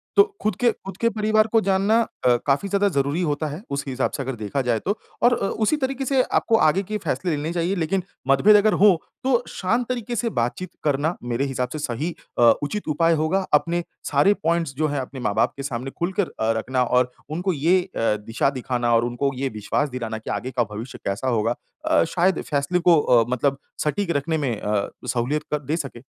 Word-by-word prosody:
तो 405 Hz, -, +8 dB, 0.2 s
ख़ुद 215 Hz, -, +1 dB
के 245 Hz, -1 st, +3 dB
ख़ुद 195 Hz, -2 st, -10 dB
के 230 Hz, -, +2 dB
परिवार 215 Hz, 0 st, +2 dB
को 225 Hz, -, +5 dB
जानना 200 Hz, +3 st, +2 dB, 0.3 s
अ, 125 Hz, -1 st, +6 dB
काफ़ी 140 Hz, +8 st, +1 dB
ज़्यादा 200 Hz, +1 st, +2 dB
ज़रूरी 140 Hz, +2 st, 0 dB
होता 155 Hz, -1 st, -1 dB
है। 150 Hz, +5 st, -6 dB
उस 140 Hz, 0 st, -2 dB
हिसाब 130 Hz, 0 st, -1 dB
से -, -, -3 dB
अगर 130 Hz, -1 st, -4 dB
देखा 110 Hz, +6 st, -2 dB
जाए 115 Hz, -2 st, +2 dB
तो 205 Hz, +3 st, -2 dB, 0.3 s
और 245 Hz, 0 st, +6 dB
अ, 195 Hz, -, -1 dB
उसी 225 Hz, +10 st, 0 dB
तरीके 270 Hz, -1 st, -2 dB
से 265 Hz, -1 st, +3 dB
आपको 225 Hz, -, +1 dB
आगे 190 Hz, +6 st, +2 dB
के 215 Hz, +3 st, -3 dB
फैसले 180 Hz, -4 st, -2 dB
लेने 150 Hz, +3 st, -3 dB
चाहिए 175 Hz, +3 st, 0 dB
लेकिन 175 Hz, +2 st, 0 dB, 0.2 s
मतभेद 185 Hz, +11 st, +6 dB
अगर 210 Hz, +1 st, +5 dB
हो, 190 Hz, -4 st, +5 dB, 0.2 s
तो 250 Hz, -2 st, +2 dB
शांत 230 Hz, +6 st, -1 dB
तरीके 240 Hz, -1 st, -3 dB
से 230 Hz, +2 st, 0 dB
बातचीत 125 Hz, -, -2 dB
करना 150 Hz, +3 st, +1 dB
मेरे 120 Hz, +3 st, -1 dB
हिसाब 125 Hz, -2 st, -2 dB
से 155 Hz, -, -4 dB
सही 145 Hz, +6 st, -3 dB, 0.3 s
अ, -, -, +4 dB, 0.2 s
उचित 205 Hz, +7 st, -3 dB
उपाय 165 Hz, +2 st, +3 dB
होगा। 160 Hz, +5 st, 0 dB
अपने 170 Hz, +3 st, +2 dB, 0.3 s
सारे 145 Hz, +8 st, +5 dB
पॉइंट्स 165 Hz, -3 st, +1 dB
जो 155 Hz, +1 st, +2 dB
हैं 145 Hz, -1 st, -2 dB
अपने 130 Hz, 0 st, -6 dB
माँ-बाप 100 Hz, -, +1 dB
के 140 Hz, -, -5 dB
सामने 130 Hz, 0 st, -4 dB
खुलकर 185 Hz, +2 st, 0 dB
अ, 110 Hz, +1 st, +2 dB
रखना 125 Hz, +3 st, 0 dB
और 125 Hz, 0 st, +2 dB, 0.2 s
उनको 180 Hz, +4 st, -1 dB
ये 170 Hz, +6 st, +3 dB
अ, 185 Hz, -, -9 dB, 0.3 s
दिशा 115 Hz, +4 st, +1 dB
दिखाना 125 Hz, -3 st, -1 dB
और 115 Hz, -, +3 dB
उनको 120 Hz, +3 st, -1 dB
ये 135 Hz, +1 st, -2 dB
विश्वास 145 Hz, +8 st, 0 dB
दिलाना 115 Hz, -4 st, -4 dB
कि 110 Hz, -, -9 dB
आगे 130 Hz, -, -3 dB
का 120 Hz, -1 st, +1 dB
भविष्य 115 Hz, +5 st, -7 dB
कैसा 100 Hz, +6 st, -2 dB
होगा। 115 Hz, -1 st, +1 dB, 0.3 s
अ, -, -, +4 dB
शायद 175 Hz, +3 st, +1 dB
इस -, -, -5 dB
फैसले 145 Hz, +5 st, +1 dB
को 170 Hz, -2 st, +5 dB
अ, 120 Hz, -2 st, +4 dB
मतलब 135 Hz, +2 st, +1 dB, 0.3 s
सटीक 170 Hz, +4 st, -1 dB
रखने 160 Hz, +3 st, -1 dB
में 140 Hz, -5 st, -1 dB
अ, 105 Hz, -1 st, -1 dB, 0.2 s
सहूलियत 130 Hz, +6 st, 0 dB
क 150 Hz, -, +1 dB
दे 155 Hz, +3 st, 0 dB
सके। 135 Hz, -6 st, -6 dB
155 Hz, 215 wpm, -23 LUFS, 130-195 Hz, 0.3 s, तो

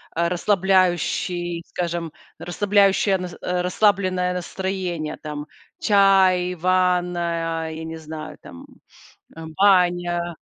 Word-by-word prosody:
э, 170 Hz, +1 st, +1 dB
расслабляющий, 175 Hz, -2 st, 0 dB
скажем, 170 Hz, -2 st, -4 dB, 0.3 s
расслабляющее 200 Hz, +1 st, +2 dB
нас 180 Hz, -1 st, -6 dB
э, 180 Hz, 0 st, -1 dB
расслабленное 185 Hz, -1 st, +1 dB
настроение, 180 Hz, -3 st, -4 dB
там? 150 Hz, -1 st, -6 dB, 0.3 s
Чай, 190 Hz, -3 st, +4 dB
ванная, 175 Hz, -2 st, 0 dB
я 160 Hz, 0 st, -7 dB
не 160 Hz, 0 st, -6 dB
знаю, 155 Hz, 0 st, -8 dB
там, 85 Hz, -, -12 dB, 0.7 s
э, -, -, -9 dB, 0.2 s
баня, 175 Hz, -3 st, +2 dB
180 Hz, 95 wpm, -22 LUFS, 170-185 Hz, 0.7 s, Чай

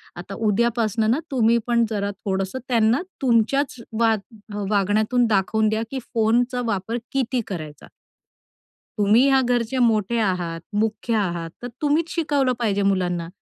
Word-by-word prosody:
आता 175 Hz, +3 st, -8 dB
उद्यापासनं 220 Hz, 0 st, +1 dB
ना 260 Hz, -, +2 dB
तुम्ही 235 Hz, -3 st, +3 dB
पण 235 Hz, -1 st, +3 dB
जरा 200 Hz, -2 st, -2 dB
थोडंसं 195 Hz, +4 st, -2 dB
त्यांना 230 Hz, +2 st, +3 dB, 0.2 s
तुमच्याच 265 Hz, +3 st, +2 dB, 0.2 s
वाग 225 Hz, -1 st, +3 dB, 0.5 s
वागण्यातून 215 Hz, +4 st, +2 dB
दाखवून 215 Hz, +1 st, +2 dB
द्या 220 Hz, +1 st, -1 dB
की 270 Hz, -, -3 dB
फोनचा 240 Hz, +3 st, +2 dB
वापर 225 Hz, +1 st, -2 dB
किती 255 Hz, -2 st, 0 dB
करायचा?" 155 Hz, -7 st, -7 dB, 1.1 s
"तुम्ही 210 Hz, +5 st, +4 dB
ह्या 270 Hz, -1 st, +4 dB
घरचे 245 Hz, 0 st, 0 dB
मोठे 230 Hz, -2 st, +2 dB
आहात, 175 Hz, -5 st, -1 dB
मुख्य 215 Hz, +2 st, -1 dB
आहात. 175 Hz, -5 st, -1 dB
तर 245 Hz, -, -4 dB
तुम्हीच 310 Hz, +3 st, +1 dB
शिकवलं 285 Hz, -6 st, +1 dB
पाहिजे 205 Hz, -4 st, 0 dB
मुलांना." 180 Hz, -4 st, 0 dB
220 Hz, 135 wpm, -22 LUFS, 200-245 Hz, 1.1 s, तुम्ही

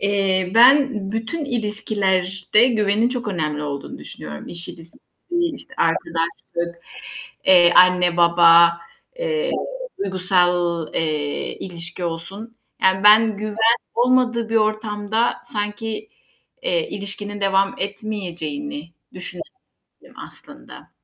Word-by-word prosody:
Eee, 195 Hz, -2 st, 0 dB
ben 270 Hz, +4 st, +6 dB, 0.2 s
bütün 225 Hz, +9 st, -3 dB
ilişkilerde 210 Hz, -3 st, 0 dB
güvenin 215 Hz, -1 st, +1 dB
çok 245 Hz, -3 st, -4 dB
önemli 155 Hz, -5 st, -2 dB
olduğunu 140 Hz, -2 st, -6 dB
düşünüyorum. 75 Hz, -1 st, -9 dB
İş 170 Hz, 0 st, -9 dB
ilişkisi, 165 Hz, 0 st, -13 dB, 0.3 s
işte, 345 Hz, -4 st, -3 dB
arkadaşlık, 170 Hz, +1 st, -2 dB, 0.6 s
eee, 175 Hz, -2 st, +6 dB
anne 180 Hz, -1 st, +5 dB
baba, 170 Hz, 0 st, +6 dB, 0.4 s
eee, 485 Hz, 0 st, -1 dB, 0.5 s
duygusal, 180 Hz, -3 st, +1 dB
eee, 150 Hz, -3 st, -2 dB
ilişki 170 Hz, -1 st, -8 dB
olsun, 195 Hz, +8 st, -6 dB, 0.3 s
yani 190 Hz, +1 st, +2 dB
ben 215 Hz, 0 st, +6 dB
güven 215 Hz, 0 st, -5 dB, 0.4 s
olmadığı 240 Hz, -2 st, +2 dB
bir 225 Hz, -, -1 dB
ortamda 215 Hz, +1 st, 0 dB, 0.2 s
sanki, 215 Hz, -, -4 dB, 0.5 s
eee, -, -, -1 dB
ilişkinin 205 Hz, +1 st, -7 dB
devam 195 Hz, 0 st, +1 dB
etmeyeceğini 170 Hz, -7 st, -5 dB, 0.2 s
düşündüm 180 Hz, -1 st, -7 dB, 0.8 s
aslında -, -, -14 dB
195 Hz, 95 wpm, -21 LUFS, 170-225 Hz, 0.8 s, ben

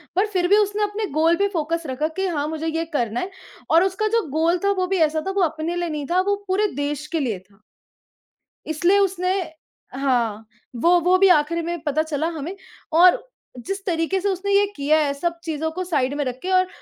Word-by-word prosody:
पर 385 Hz, +3 st, +3 dB
फ़िर 355 Hz, -2 st, +2 dB
भी 405 Hz, +3 st, +5 dB
उसने 415 Hz, 0 st, +1 dB
अपने 415 Hz, +1 st, -2 dB
गोल 320 Hz, +3 st, +3 dB
पे 400 Hz, -, +2 dB
फ़ोकस 335 Hz, 0 st, -1 dB
रखा 265 Hz, +4 st, -1 dB
कि 385 Hz, 0 st, 0 dB
हाँ 300 Hz, -4 st, -1 dB
मुझे 320 Hz, +1 st, -4 dB
ये 325 Hz, +1 st, -1 dB
करना 240 Hz, -4 st, 0 dB
है 370 Hz, -, -4 dB, 0.4 s
और 330 Hz, +2 st, +6 dB
उसका 385 Hz, +3 st, 0 dB
जो 455 Hz, -, 0 dB
गोल 325 Hz, +4 st, +2 dB
था 400 Hz, -, +3 dB
वो 370 Hz, 0 st, 0 dB
भी 385 Hz, +1 st, 0 dB
ऐसा 310 Hz, +1 st, -2 dB
था -, -, 0 dB
वो 390 Hz, 0 st, 0 dB
अपने 320 Hz, +1 st, -2 dB
लिए 350 Hz, -1 st, -2 dB
नहीं 300 Hz, -2 st, -4 dB
था 365 Hz, +1 st, +4 dB
वो 405 Hz, +2 st, +1 dB
पूरे 395 Hz, +3 st, +2 dB
देश 290 Hz, +1 st, -3 dB
के 330 Hz, -, -2 dB
लिए 235 Hz, -9 st, -2 dB
था। 195 Hz, +2 st, -27 dB, 1.1 s
इसलिए 345 Hz, +5 st, +2 dB
उसने 370 Hz, -2 st, +1 dB, 0.7 s
हाँ 235 Hz, -5 st, 0 dB, 0.4 s
वो 350 Hz, +3 st, +5 dB
वो 360 Hz, +2 st, +4 dB
भी 390 Hz, +1 st, +5 dB
आख़िरी 335 Hz, 0 st, +3 dB
में 340 Hz, +1 st, -3 dB
पता 305 Hz, 0 st, +1 dB
चला 315 Hz, 0 st, -2 dB
हमें। 320 Hz, +6 st, -5 dB, 0.4 s
और 360 Hz, +8 st, +6 dB, 0.4 s
जिस 390 Hz, 0 st, -4 dB
तरीके 335 Hz, +1 st, 0 dB
से 405 Hz, -, 0 dB
उसने 390 Hz, +1 st, -2 dB
ये 400 Hz, +1 st, +5 dB
किया 290 Hz, +2 st, +2 dB
है 285 Hz, -2 st, 0 dB
सब 340 Hz, +4 st, -3 dB
चीज़ों 320 Hz, -1 st, -2 dB
को 370 Hz, +3 st, -4 dB
साइड 285 Hz, -7 st, 0 dB
में 290 Hz, -, 0 dB
रख़ 250 Hz, -1 st, -3 dB
के। 375 Hz, -, -3 dB
और 370 Hz, 0 st, +4 dB
335 Hz, 220 wpm, -22 LUFS, 300-375 Hz, 1.1 s, और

